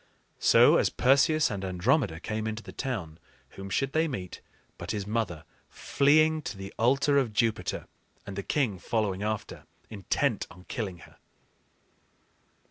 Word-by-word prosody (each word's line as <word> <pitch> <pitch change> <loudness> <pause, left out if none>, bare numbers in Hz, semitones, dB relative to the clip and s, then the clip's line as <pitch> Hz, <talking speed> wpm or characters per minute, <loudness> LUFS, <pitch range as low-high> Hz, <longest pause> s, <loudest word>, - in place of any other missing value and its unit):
So, - - +6
as - - +2
Perseus 140 +4 +3
and 100 -2 -4
Andromeda 95 - +1
came 110 +4 -3
into 110 0 -4
the - - -10
town, 95 - -5 0.3
whom 95 0 -9
should 135 +7 -1
they 160 +1 +2
meet 95 - -6 0.4
but - - -7
his 105 -2 -2
mother 105 -7 -2 0.3
fleeing 155 +3 +3
to 100 -8 -6
the 95 0 -8
altar 135 +4 +3
of 120 -5 -2
Jupiter, 115 0 -1 0.4
and 100 - -7
the 100 - -3
king 110 -4 -1
following 100 -2 -1
after, 105 0 -4 0.3
intent 110 +3 -1
on 90 - -15
killing 95 -3 -5
her? - - -20
110 Hz, 145 wpm, -28 LUFS, 95-135 Hz, 0.4 s, So